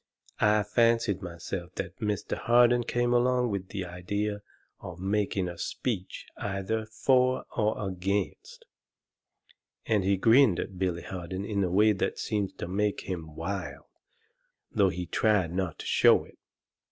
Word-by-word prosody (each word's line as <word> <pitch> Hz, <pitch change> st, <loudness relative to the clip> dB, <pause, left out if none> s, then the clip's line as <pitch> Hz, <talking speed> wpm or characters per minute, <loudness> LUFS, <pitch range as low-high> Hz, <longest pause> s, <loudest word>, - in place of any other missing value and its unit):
I 105 Hz, 0 st, +4 dB
fancied 115 Hz, -1 st, +2 dB
myself 90 Hz, 0 st, -6 dB
that 95 Hz, 0 st, -5 dB
Mr. 105 Hz, -2 st, -2 dB
Harden 120 Hz, 0 st, +4 dB
came 120 Hz, +1 st, +1 dB
along 125 Hz, -1 st, +2 dB
with 95 Hz, -2 st, -3 dB
the 95 Hz, -2 st, -4 dB
idea 100 Hz, +4 st, -3 dB, 0.4 s
of 90 Hz, -2 st, -8 dB
making 100 Hz, -1 st, 0 dB
a 85 Hz, -1 st, -7 dB
speech 105 Hz, -8 st, -4 dB
either 105 Hz, +3 st, -2 dB
for 130 Hz, +3 st, +2 dB
or 105 Hz, -1 st, 0 dB
against." 95 Hz, +2 st, -3 dB, 1.2 s
And 105 Hz, -3 st, +2 dB
he 95 Hz, +1 st, +2 dB
grinned 115 Hz, -1 st, +5 dB
at 95 Hz, -2 st, -5 dB
Billy 90 Hz, -2 st, -1 dB
Harden 95 Hz, +1 st, -5 dB
in 100 Hz, -2 st, 0 dB
a 90 Hz, -, 0 dB
way 105 Hz, +4 st, +4 dB
that 100 Hz, -, -1 dB
seemed 100 Hz, -3 st, -2 dB
to -, -, -5 dB
make 105 Hz, +3 st, 0 dB
him 80 Hz, -5 st, -6 dB
wild, 95 Hz, +5 st, -5 dB, 0.9 s
though 100 Hz, -3 st, +3 dB
he 90 Hz, 0 st, -4 dB
tried 95 Hz, -4 st, +1 dB
not 90 Hz, -3 st, -2 dB
to -, -, -8 dB
show -, -, +5 dB
it. -, -, -19 dB
100 Hz, 145 wpm, -28 LUFS, 90-110 Hz, 1.2 s, grinned